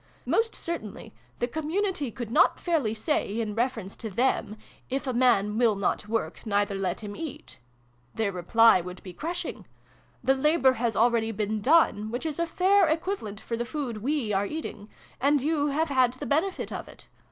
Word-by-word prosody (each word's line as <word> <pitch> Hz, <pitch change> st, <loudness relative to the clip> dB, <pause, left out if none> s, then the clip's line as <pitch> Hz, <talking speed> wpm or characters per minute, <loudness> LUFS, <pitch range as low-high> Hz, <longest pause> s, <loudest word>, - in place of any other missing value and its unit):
Most 450 Hz, 0 st, +1 dB
certainly, 225 Hz, -, -6 dB, 0.2 s
the 240 Hz, -, -1 dB
community 315 Hz, +1 st, -1 dB
could 230 Hz, -1 st, -7 dB
not 330 Hz, +9 st, +4 dB
fairly 295 Hz, -11 st, 0 dB
say, 225 Hz, -3 st, -1 dB
in 215 Hz, -2 st, -2 dB
reference 225 Hz, -4 st, -2 dB
to 225 Hz, -, -5 dB
them, 220 Hz, 0 st, 0 dB, 0.2 s
' -, -, -25 dB
if 270 Hz, +2 st, -2 dB
a 260 Hz, -, -1 dB
man 230 Hz, -4 st, +3 dB
will 230 Hz, -4 st, +4 dB
not 200 Hz, +1 st, -1 dB
work, 215 Hz, -8 st, -2 dB
neither 205 Hz, -2 st, 0 dB
let 195 Hz, -2 st, -1 dB
htm 205 Hz, -1 st, -6 dB
eat." 135 Hz, -, -8 dB, 0.6 s
Their 220 Hz, -3 st, 0 dB
reply 190 Hz, +3 st, +5 dB
would 180 Hz, +1 st, -9 dB
be 185 Hz, -, -9 dB
crushing. 340 Hz, -, -5 dB, 0.6 s
'The 265 Hz, -, +4 dB
labour 270 Hz, -1 st, +3 dB
has 235 Hz, -3 st, -1 dB
already 230 Hz, 0 st, +2 dB
been 215 Hz, 0 st, -2 dB
done, 235 Hz, -6 st, +3 dB
which 245 Hz, +7 st, -4 dB
is 315 Hz, 0 st, -3 dB
a 340 Hz, -, +1 dB
fair 375 Hz, +2 st, +4 dB
equivalent 315 Hz, -, -2 dB
for 230 Hz, -, -4 dB
the 235 Hz, -, -2 dB
food 250 Hz, -3 st, -4 dB
we 245 Hz, -1 st, -1 dB
are 200 Hz, +1 st, +1 dB
eating; 220 Hz, -8 st, -6 dB, 0.3 s
and 285 Hz, +2 st, +3 dB
you 295 Hz, +1 st, +1 dB
have 305 Hz, +3 st, 0 dB
had 255 Hz, -3 st, +3 dB
the 255 Hz, -, -7 dB
benefit 330 Hz, +7 st, 0 dB
of -, -, -5 dB
it. -, -, -15 dB
240 Hz, 185 wpm, -27 LUFS, 210-305 Hz, 0.6 s, reply